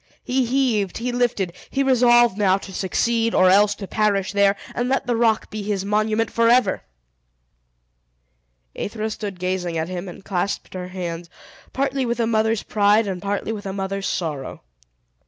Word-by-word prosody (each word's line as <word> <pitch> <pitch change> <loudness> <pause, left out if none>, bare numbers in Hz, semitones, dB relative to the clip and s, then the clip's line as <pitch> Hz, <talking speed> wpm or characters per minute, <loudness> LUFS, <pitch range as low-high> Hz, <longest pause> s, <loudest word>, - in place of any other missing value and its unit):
He 255 0 0
heaved, 235 -7 +1
he 245 +2 -2
lifted, 235 -7 0 0.2
he 275 - 0
resolved 240 -4 +5
now 195 -2 +3
to 195 -1 -10
succeed, 230 +5 0
or 185 0 +5
else 205 +1 +4
to 205 - -7
perish 205 -2 0
there, 200 0 +4 0.2
and 245 +1 -1
let 270 - 0
the 245 - 0
rock 225 -1 +1
be 215 0 -4
his 200 -1 -2
monument 215 +2 0
forever! 230 -3 +3 1.9
Aethra 220 +1 -3
stood 200 -4 -6
gazing 180 -2 -2
at 160 +2 -2
him, 185 0 -5
and 185 +2 -12
clasped 195 0 -2
her 180 -1 -5
hands, 175 -2 -5 0.4
partly 275 0 -1
with 240 -1 -2
a 230 - +2
mother's 220 -1 +1
pride, 210 +1 +3
and 190 -3 -4
partly 200 +2 -2
with 205 -2 -5
a 190 - -4
mother's 195 0 -3
sorrow. 150 -6 -4
205 Hz, 165 wpm, -22 LUFS, 190-230 Hz, 1.9 s, resolved